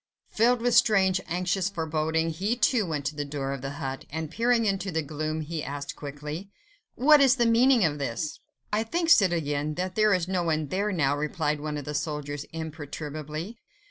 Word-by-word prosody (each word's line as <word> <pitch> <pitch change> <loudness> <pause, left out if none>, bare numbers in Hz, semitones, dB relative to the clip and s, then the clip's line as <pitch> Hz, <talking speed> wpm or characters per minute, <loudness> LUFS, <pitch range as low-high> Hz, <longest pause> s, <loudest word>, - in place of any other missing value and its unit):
Filled 235 +2 +3
with 245 -1 +2
strange, 195 -6 +4
anxious 180 +2 0
foreboding, 160 -2 -1
he, 195 +8 -1
too, 235 -4 +2
went 150 -3 -3
to 145 +1 -2
the 145 - -2
door 140 -1 -4
of 135 - -6
the 135 +1 -5
hut, 135 -2 -5
and 160 +1 -4
peering 230 +2 +2
into 195 -1 0
the 160 -1 -1
gloom, 155 +2 -3
he 155 0 -4
asked 140 +1 -5
quickly,— 150 +6 -7 0.5
"What 295 +3 +6
is 270 -2 +6
the 240 -3 +2
meaning 235 -1 +5
of 150 -2 -1
this?" 140 +3 -3 0.3
"I 210 - +2
think, 330 +9 -1
citoyen, 155 - +3
that 185 +2 -3
there 215 -1 +4
is 180 -1 -1
no 185 -1 0
one 155 -3 -1
there 200 +5 0
now," 145 -6 +1
replied 150 0 -1
one 150 0 -4
of 145 - -6
the 150 - -4
soldiers 150 -2 -3
imperturbably. 155 +4 -6
160 Hz, 190 wpm, -27 LUFS, 150-200 Hz, 0.5 s, What